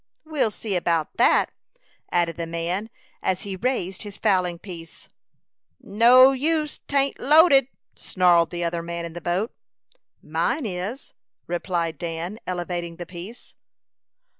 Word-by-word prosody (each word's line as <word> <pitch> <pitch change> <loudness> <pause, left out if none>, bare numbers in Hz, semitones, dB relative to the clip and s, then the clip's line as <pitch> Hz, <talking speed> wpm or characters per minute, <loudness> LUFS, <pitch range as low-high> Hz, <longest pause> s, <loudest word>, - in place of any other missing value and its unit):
"We'll 305 -7 0
see 210 -1 -4
about 170 -3 0
that," - - +4 0.6
added 170 -2 +1
the 170 -1 -4
man, 170 +6 -3 0.3
as 185 -1 -1
he 195 -2 -5
raised 195 -4 -2
his 205 -2 -6
fowling 185 -5 +1
piece. 170 -3 -11 0.7
"No 245 +6 +6
use, 300 +3 0
'tain't 280 -1 +1
loaded," 290 -2 +6 0.3
snarled 175 -3 +3
the 175 0 -3
other 170 0 -1
man 170 0 -5
in 165 - -8
the 175 - -7
boat. 180 +7 -1 0.7
"Mine 170 - -1
is," 200 +6 -5 0.3
replied 170 -3 -2
Dan, 170 +5 -4
elevating 175 -1 -3
the 175 - -7
piece. 185 +7 -11
180 Hz, 130 wpm, -24 LUFS, 170-230 Hz, 0.7 s, No